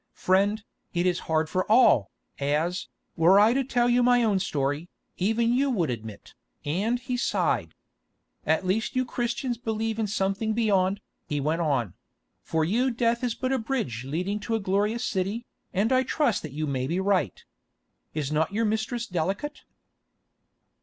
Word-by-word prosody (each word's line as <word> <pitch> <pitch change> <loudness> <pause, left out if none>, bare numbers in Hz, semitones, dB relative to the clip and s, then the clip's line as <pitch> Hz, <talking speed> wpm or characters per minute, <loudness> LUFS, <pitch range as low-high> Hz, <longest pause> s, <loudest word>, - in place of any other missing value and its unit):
"Friend, 200 +3 +2 0.3
it 175 +1 +1
is 180 -1 +1
hard 160 0 +2
for 185 +5 -1
all, 220 - +5 0.3
as, 150 +6 0 0.3
were 180 +4 +6
I 215 +3 +5
to 270 +1 +1
tell 245 -2 +1
you 245 0 +3
my 245 0 +4
own 205 -4 +2
story, 145 -1 -2 0.3
even 225 +5 +1
you 275 +3 +2
would 175 - 0
admit," 110 -3 -8 0.3
and 205 +11 0
he 250 0 -3
sighed. 245 - 0 0.7
"At 160 +4 +1
least 210 +7 0
you 255 0 +1
Christians 240 0 -2
believe 225 -1 -2
in 220 - 0
something 200 +2 -1
beyond," 200 -3 +1 0.3
he 145 - -1
went 155 +4 0
on; 130 - 0 0.5
"for 160 -1 0
you 240 +9 +2
death 235 0 0
is 240 -2 0
but 260 0 -1
a 265 - +1
bridge 220 - -2
leading 180 +10 -2
to 225 +2 -2
a - - 0
glorious 205 +4 0
city, 200 +5 -2 0.3
and 200 +5 +1
I 255 - +4
trust 260 -2 +1
that 155 - -7
you 155 +3 -3
may 130 -3 -2
be 170 +5 -1
right. 190 - +1 0.8
Is 150 -2 -2
not 155 +2 +1
your 225 +3 0
mistress 220 +2 -1
delicate?" 195 - -3
200 Hz, 165 wpm, -26 LUFS, 160-235 Hz, 0.8 s, were